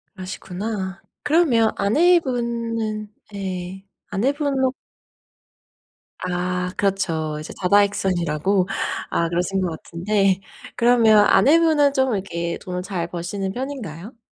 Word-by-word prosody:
그러시구나. 190 Hz, +1 st, -5 dB, 0.2 s
그러면 290 Hz, -8 st, +3 dB
아내분은 230 Hz, -, +1 dB, 0.2 s
예 190 Hz, -1 st, -5 dB, 0.2 s
아내분은 270 Hz, +3 st, 0 dB, 1.5 s
아 180 Hz, 0 st, -2 dB
그렇죠. 170 Hz, -6 st, -1 dB
이제 155 Hz, -, -8 dB
다다익선이라고. 185 Hz, -2 st, +2 dB, 0.4 s
아 170 Hz, 0 st, 0 dB
그러신 180 Hz, +3 st, -1 dB
것 180 Hz, -, 0 dB
같은데. 195 Hz, +2 st, 0 dB, 0.3 s
그러면 230 Hz, -3 st, +5 dB
아내분은 295 Hz, +6 st, +4 dB
좀 265 Hz, -3 st, +2 dB
이렇게 170 Hz, -4 st, -3 dB
돈을 180 Hz, -2 st, -4 dB
잘 180 Hz, -4 st, -3 dB
버시는 180 Hz, +3 st, -4 dB
편인가요? 235 Hz, -, -6 dB
200 Hz, 245 characters per minute, -22 LUFS, 180-235 Hz, 1.5 s, 그러면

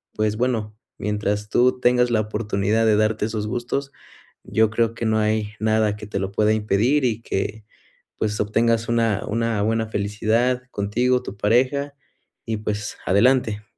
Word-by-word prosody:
pues, 105 Hz, 0 st, 0 dB
bueno, 115 Hz, -4 st, -1 dB, 0.2 s
mientras 105 Hz, 0 st, -2 dB
tú 125 Hz, +1 st, +3 dB
tengas 125 Hz, 0 st, +3 dB
la 110 Hz, -2 st, +2 dB
oportunidad 105 Hz, 0 st, 0 dB
de 105 Hz, -, +4 dB
darte 110 Hz, 0 st, +1 dB
esos 110 Hz, -1 st, -3 dB
gustos, 125 Hz, +5 st, -3 dB, 0.5 s
yo 110 Hz, 0 st, +2 dB
creo 115 Hz, 0 st, 0 dB
que 115 Hz, -, -4 dB
no 110 Hz, 0 st, +2 dB
hay 105 Hz, 0 st, 0 dB
nada 110 Hz, -1 st, +1 dB
que 105 Hz, 0 st, -9 dB
te 105 Hz, -, -4 dB
lo 95 Hz, 0 st, -2 dB
pueda 105 Hz, +1 st, +2 dB
impedir 110 Hz, +6 st, +1 dB
y 115 Hz, -1 st, -1 dB
que 105 Hz, +1 st, -3 dB, 0.5 s
pues 105 Hz, -1 st, -2 dB
obtengas 115 Hz, +2 st, +1 dB
una 115 Hz, -3 st, +1 dB
una 115 Hz, -1 st, -1 dB
buena 110 Hz, +1 st, 0 dB
felicidad 110 Hz, +5 st, 0 dB
contigo, 125 Hz, +5 st, 0 dB
tu 100 Hz, -, -7 dB
pareja 130 Hz, +7 st, +1 dB, 0.5 s
y 110 Hz, -2 st, -2 dB
pues, 105 Hz, -1 st, -4 dB
adelante. 110 Hz, +1 st, +3 dB
110 Hz, 155 wpm, -22 LUFS, 105-120 Hz, 0.5 s, de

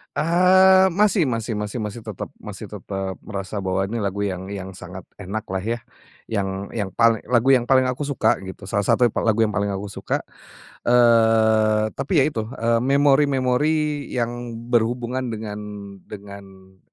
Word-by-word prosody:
Eee, 185 Hz, +3 st, +5 dB
masih 205 Hz, -5 st, +3 dB
masih 115 Hz, -3 st, -2 dB
masih 105 Hz, +1 st, -5 dB
masih 105 Hz, +2 st, -5 dB
tetap 110 Hz, -3 st, -7 dB
masih -, -, -9 dB
tetap 95 Hz, -2 st, -5 dB
merasa 100 Hz, 0 st, -5 dB
bahwa 95 Hz, 0 st, -1 dB
ini 110 Hz, +4 st, -3 dB
lagu 100 Hz, -1 st, -2 dB
yang 95 Hz, -1 st, -3 dB
yang 95 Hz, -1 st, -6 dB
sangat 95 Hz, 0 st, -10 dB, 0.2 s
enak 100 Hz, +2 st, -4 dB
lah 95 Hz, 0 st, -3 dB
ya, 115 Hz, +5 st, -3 dB, 0.5 s
yang 100 Hz, -2 st, -3 dB
yang 105 Hz, -4 st, -2 dB
pal 115 Hz, -1 st, +4 dB
lagu 125 Hz, +2 st, +3 dB
yang 125 Hz, -2 st, +3 dB
paling 130 Hz, -1 st, +5 dB
aku 130 Hz, +3 st, -2 dB
suka 140 Hz, -4 st, +1 dB
gitu. 95 Hz, +1 st, -10 dB
Salah 100 Hz, +1 st, -1 dB
satu -, -, +3 dB
yang 120 Hz, -, +4 dB
pal -, -, -2 dB
lagu 110 Hz, +1 st, +3 dB
yang 110 Hz, -, 0 dB
paling 105 Hz, 0 st, -1 dB
aku 100 Hz, +1 st, -6 dB
suka, -, -, -3 dB, 0.6 s
eee, 110 Hz, -2 st, +4 dB
tapi 140 Hz, +3 st, +2 dB
ya -, -, +5 dB
itu, 110 Hz, -7 st, -4 dB
eee, 115 Hz, 0 st, 0 dB
memori-memori 140 Hz, +2 st, +2 dB
yang 120 Hz, 0 st, -3 dB, 0.2 s
berhubungan 120 Hz, +1 st, 0 dB
dengan 105 Hz, -1 st, -6 dB, 0.5 s
dengan 95 Hz, -2 st, -12 dB
115 Hz, 165 wpm, -22 LUFS, 100-130 Hz, 0.6 s, Eee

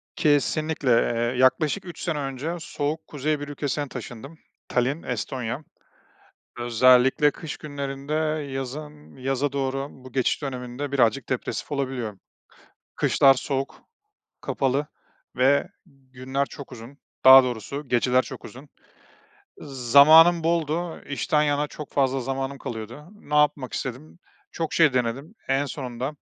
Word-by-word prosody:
Kesinlikle, 150 Hz, -1 st, +1 dB
eee, 120 Hz, +1 st, +2 dB
yaklaşık 150 Hz, +8 st, +2 dB
3 175 Hz, -, -9 dB
sene 165 Hz, -4 st, -2 dB
önce 140 Hz, +4 st, -4 dB
soğuk 155 Hz, 0 st, -4 dB
kuzey 150 Hz, +1 st, -2 dB
bir 145 Hz, -, -6 dB
ülkesine 145 Hz, 0 st, -3 dB
taşındım, 135 Hz, +6 st, -9 dB, 0.3 s
Tallinn, 130 Hz, +6 st, 0 dB
Estonya. 125 Hz, +2 st, -4 dB, 1.0 s
Özellikle 125 Hz, +4 st, +4 dB
kış 150 Hz, +1 st, -7 dB
günlerinde, 140 Hz, -1 st, -6 dB, 0.4 s
yazın, 150 Hz, +3 st, -7 dB
yaza 135 Hz, +2 st, -1 dB
doğru 135 Hz, 0 st, -2 dB
bu 130 Hz, -1 st, -14 dB
geçiş 130 Hz, +3 st, 0 dB
döneminde 130 Hz, +1 st, -5 dB
birazcık 125 Hz, -1 st, +2 dB
depresif 130 Hz, +3 st, -3 dB
olabiliyor. 130 Hz, -7 st, -3 dB, 0.8 s
Kışlar 135 Hz, -1 st, +5 dB
soğuk, 135 Hz, +1 st, -4 dB, 0.6 s
kapalı 135 Hz, +2 st, -1 dB, 0.5 s
ve 140 Hz, +7 st, +3 dB, 0.2 s
günler 135 Hz, -2 st, -4 dB
çok 140 Hz, -1 st, -11 dB
uzun, 125 Hz, +4 st, -11 dB, 0.3 s
daha 130 Hz, 0 st, +11 dB
doğrusu, 130 Hz, +4 st, -5 dB
geceler 125 Hz, +1 st, +3 dB
çok 130 Hz, -2 st, -10 dB
uzun. 135 Hz, +4 st, -11 dB, 0.9 s
Zamanım 150 Hz, +6 st, +6 dB
boldu, 165 Hz, 0 st, -1 dB
işten 150 Hz, +2 st, +1 dB
yana 145 Hz, 0 st, +1 dB
çok 150 Hz, 0 st, -10 dB
fazla 135 Hz, -1 st, +1 dB
zamanım 135 Hz, +2 st, -3 dB
kalıyordu. 115 Hz, +5 st, -7 dB
Ne 150 Hz, -8 st, -7 dB
yapmak 150 Hz, -3 st, +2 dB
istedim? 135 Hz, +6 st, -6 dB, 0.3 s
Çok 165 Hz, -2 st, -3 dB
şey 160 Hz, -4 st, +4 dB
denedim. 130 Hz, -, -2 dB
En 135 Hz, +1 st, +2 dB
sonunda 130 Hz, 0 st, -5 dB
135 Hz, 120 wpm, -24 LUFS, 130-150 Hz, 1.0 s, daha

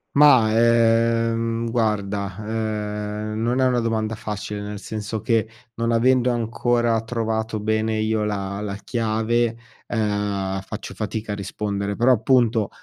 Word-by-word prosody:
Mah, 130 Hz, -7 st, +6 dB
ehm, 115 Hz, 0 st, +2 dB
guarda, 105 Hz, -4 st, -1 dB
ehm, 105 Hz, 0 st, -3 dB
non 120 Hz, +3 st, +1 dB
è 130 Hz, -, +4 dB
una 125 Hz, -1 st, +2 dB
domanda 110 Hz, -1 st, -1 dB
facile, 105 Hz, -2 st, -5 dB
nel 105 Hz, 0 st, -5 dB
senso 110 Hz, +1 st, -5 dB
che 110 Hz, 0 st, +1 dB, 0.3 s
non 115 Hz, 0 st, 0 dB
avendo 125 Hz, +2 st, +3 dB
ancora 120 Hz, -1 st, +1 dB
trovato 110 Hz, -1 st, -2 dB
bene 110 Hz, +1 st, 0 dB
io 110 Hz, 0 st, 0 dB
la 100 Hz, -1 st, -3 dB
la 100 Hz, -2 st, -4 dB
chiave, 115 Hz, +2 st, 0 dB, 0.3 s
ehm, 105 Hz, -3 st, -1 dB
faccio 105 Hz, +3 st, -7 dB
fatica 110 Hz, 0 st, -4 dB
a -, -, -2 dB
rispondere. 100 Hz, 0 st, -3 dB
Però, 120 Hz, +4 st, +4 dB
appunto, 115 Hz, -2 st, +3 dB
110 Hz, 130 wpm, -23 LUFS, 105-115 Hz, 0.3 s, Mah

